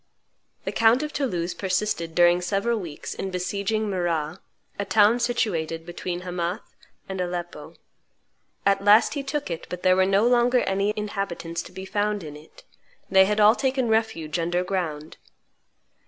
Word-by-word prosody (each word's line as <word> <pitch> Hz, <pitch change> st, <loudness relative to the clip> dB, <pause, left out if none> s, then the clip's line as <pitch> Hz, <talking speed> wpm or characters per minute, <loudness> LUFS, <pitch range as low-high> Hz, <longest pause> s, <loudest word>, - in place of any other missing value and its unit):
The -, -, -2 dB
count 230 Hz, +5 st, +4 dB
of 300 Hz, 0 st, -5 dB
Toulouse 180 Hz, -11 st, -2 dB
persisted 185 Hz, -4 st, -2 dB
during 175 Hz, 0 st, +5 dB
several 200 Hz, +5 st, 0 dB
weeks 165 Hz, -6 st, -7 dB
in 195 Hz, -, -4 dB
besieging 200 Hz, +4 st, -2 dB
Marrah, 175 Hz, -3 st, -2 dB, 0.4 s
a -, -, +1 dB
town 215 Hz, +3 st, +4 dB
situated 170 Hz, -9 st, -1 dB
between 175 Hz, +1 st, -5 dB
Hamath 180 Hz, +2 st, -4 dB, 0.3 s
and 190 Hz, -1 st, -4 dB
Aleppo. 175 Hz, -1 st, -5 dB, 0.9 s
At 195 Hz, 0 st, +2 dB
last 205 Hz, +2 st, +6 dB
he 285 Hz, -, -2 dB
took 275 Hz, -, -3 dB
it, 165 Hz, -1 st, -5 dB
but 180 Hz, 0 st, -6 dB
there 185 Hz, 0 st, +5 dB
were 190 Hz, 0 st, +3 dB
no 195 Hz, +3 st, +3 dB
longer 245 Hz, +1 st, +3 dB
any 195 Hz, +2 st, 0 dB
inhabitants 195 Hz, -5 st, -4 dB
to -, -, -12 dB
be 190 Hz, +1 st, -8 dB
found 205 Hz, 0 st, -1 dB
in 150 Hz, -2 st, -8 dB
it; 150 Hz, +2 st, -16 dB, 0.5 s
they 190 Hz, 0 st, +7 dB
had 210 Hz, +2 st, 0 dB
all 210 Hz, +1 st, +7 dB
taken 260 Hz, -1 st, 0 dB
refuge 220 Hz, -8 st, 0 dB
under 175 Hz, +2 st, 0 dB
ground. 165 Hz, -5 st, -4 dB
190 Hz, 155 wpm, -25 LUFS, 175-215 Hz, 0.9 s, they